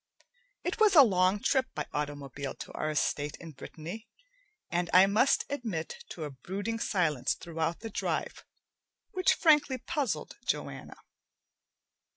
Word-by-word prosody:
It 360 - -2
was 425 -3 +5
a 290 - +11
long 185 -3 +3
trip 265 -1 +2
by 150 - -2
automobile 145 -2 -4
to - - -8
our 155 - -2
estate 150 0 -1
in 165 -2 -9
Brittany, 165 - -8 0.6
and 175 -1 0
I 185 +1 +9
must 215 +7 +3
admit 220 - -4
to 165 - -6
a 150 - -4
brooding 200 - -4
silence 155 - +1
throughout 165 0 -3
the 225 -1 -6
drive - - -2 0.7
which 370 0 +3
frankly 295 -5 +4
puzzled 280 0 -3
Joanna. - - -3
185 Hz, 135 wpm, -30 LUFS, 155-245 Hz, 0.7 s, a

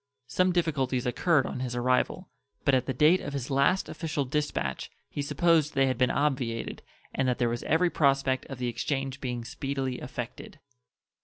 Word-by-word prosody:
Some 180 +9 +2
difficulties 140 -8 0
occurred 145 +4 +2
on - - -4
his 125 -1 -3
arrival, 125 +1 +1 0.4
but 140 - +4
at 130 -1 +2
the - - 0
date 155 +8 +5
of 145 - -5
his 140 -1 -4
last 140 +8 +3
official 155 -4 -2
dispatch 130 - -2 0.2
he 145 - -3
supposed 155 +1 +2
they 135 0 +4
had 130 0 -1
been 125 - +4
obviated 130 -6 -1 0.3
and 135 - 0
that 125 - +1
there 120 -2 +1
was 120 0 -2
every 170 +3 +2
prospect 135 -3 +2
of 135 - -7
the 125 0 -2
exchange 135 +2 -2
being 120 -3 -3
speedily 135 +1 -3
effected. - - -7
135 Hz, 175 wpm, -28 LUFS, 125-150 Hz, 0.4 s, date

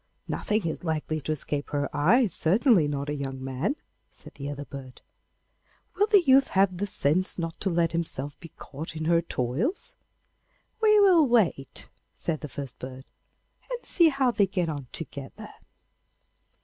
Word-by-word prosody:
'Nothing 210 -3 -1
is 160 - -3
likely 155 -1 -2
to 155 - -3
escape 145 -1 +2
her 145 -1 -1
eyes, 195 - +3
certainly 195 - +3
not 140 -1 -3
a 145 - -2
young 135 -2 -5
man,' 135 - -2 0.3
said - - -14
the 140 -1 -6
other 145 0 -6
bird. 130 -2 -10 0.9
'Will 415 - +2
the 410 -4 +5
youth 270 -2 +5
have 190 -1 +2
the 205 +3 -2
sense 185 -2 0
not 165 -2 -4
to 195 - -1
let 170 -1 +1
himself 145 -4 -3
be 165 - -11
caught 155 +2 -9
in 155 0 -4
her 170 0 +3
toils?' 165 - -2 0.9
'We 425 -1 +6
will 355 -7 +6
wait,' 200 - 0 0.3
said 160 -3 -2
the 150 - -7
first 135 -1 -6
bird, 130 +1 -8 0.6
'and - - -5
see 340 -3 +5
how 270 -3 +1
they 205 -4 +2
get 180 -3 -1
on 145 -4 -5
together. 140 -4 -8
165 Hz, 160 wpm, -27 LUFS, 145-215 Hz, 0.9 s, We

